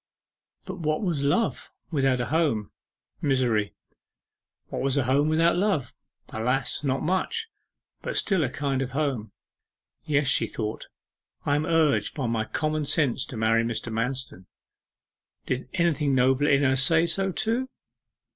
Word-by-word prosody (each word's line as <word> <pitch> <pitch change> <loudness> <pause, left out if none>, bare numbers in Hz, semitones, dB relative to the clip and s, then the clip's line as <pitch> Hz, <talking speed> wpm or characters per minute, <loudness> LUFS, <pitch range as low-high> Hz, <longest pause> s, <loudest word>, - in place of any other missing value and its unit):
But 185 0 -7
what 155 +2 -1
was 165 -7 -1
love 145 +11 0 0.2
without 135 -4 +2
a 120 - 0
home? 135 -7 0 0.5
Misery. 125 -7 +1 0.9
What - - -4
was 135 +1 0
a 140 - +3
home 140 +4 +2
without 165 +2 +3
love? 175 - 0 0.4
Alas, 125 +6 -1
not 135 0 0
much; 190 - -1 0.5
but - - -2
still 190 -6 +3
a 130 - 0
kind 135 0 -2
of 135 -1 -4
home. 130 -9 -1 0.7
'Yes,' 145 -2 +1
she 130 - +3
thought, 110 -1 -5 0.6
'I 145 - +2
am 150 - -1
urged 160 -3 +2
by 140 - -2
my 115 -2 -1
common 155 +3 -2
sense 135 -5 +1
to 125 - -7
marry 110 +1 +2
Mr. 115 0 -3
Manston.' 120 -5 -3 1.0
Did 130 0 -3
anything 155 -6 +1
nobler 130 +3 +3
in 140 0 +4
her 135 -1 +3
say 160 +5 +4
so 195 +3 0
too? 235 +7 -1
140 Hz, 145 wpm, -26 LUFS, 125-160 Hz, 1.0 s, in